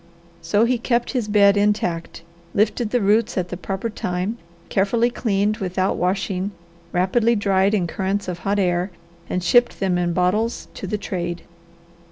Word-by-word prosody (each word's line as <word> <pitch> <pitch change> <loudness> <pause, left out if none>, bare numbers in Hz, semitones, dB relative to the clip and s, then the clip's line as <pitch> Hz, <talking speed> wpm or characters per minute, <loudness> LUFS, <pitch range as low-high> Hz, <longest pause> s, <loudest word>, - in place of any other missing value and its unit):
So 205 +7 +2
he 245 0 +1
kept 240 0 0
his 245 -6 -1
bed 205 -1 +5
intact, 200 -5 0 0.3
lifted 215 +2 +1
the 245 +1 +1
roots 215 +4 +2
at 180 -1 -1
the - - -4
proper 195 +4 -4
time, 195 +1 -3 0.3
carefully 230 +5 +1
cleaned 210 -3 0
without 185 -2 -1
washing, 190 +1 -1 0.4
rapidly 220 +6 +2
dried 200 0 +2
in 185 -4 +1
currents 195 +3 -2
of 180 -1 -4
hot 200 +2 -1
air, 180 -1 +1 0.4
and 180 - -1
shipped 240 +7 +3
them 185 -2 +1
in 175 -1 0
bottles 185 +6 0
to 195 - -6
the 210 - -1
trade. 175 -4 -4
200 Hz, 160 wpm, -22 LUFS, 180-215 Hz, 0.4 s, bed